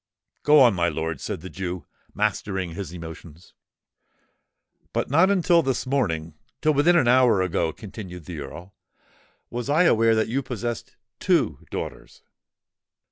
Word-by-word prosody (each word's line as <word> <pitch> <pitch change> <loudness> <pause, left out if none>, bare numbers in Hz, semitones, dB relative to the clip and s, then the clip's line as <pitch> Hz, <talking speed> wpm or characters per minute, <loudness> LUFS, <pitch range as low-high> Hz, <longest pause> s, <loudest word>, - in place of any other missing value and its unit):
"Go 150 0 +6
on, 120 -4 +6
my 85 -2 +1
lord," 80 -2 -3
said 100 -6 -4
the 95 - -8
Jew, 90 -4 -5 0.3
mastering 95 -4 -1
his 95 +1 -6
emotions. 85 -1 -10 1.4
"But - - -1
not 165 +7 +5
until 175 -3 +4
this 135 -4 -1
morning—till 95 - -1
within 155 +5 +4
an 150 -8 +4
hour 120 -6 +5
ago," 85 -2 0
continued 95 -3 -9
the 85 -4 -7
Earl, 85 +7 -9 0.8
"was 120 +2 -4
I 155 +5 +4
aware 115 -8 +4
that 110 - +1
you 130 +5 -1
possessed 120 -2 -5 0.2
two 165 - +1
daughters. - - -7
105 Hz, 135 wpm, -24 LUFS, 85-135 Hz, 1.4 s, Go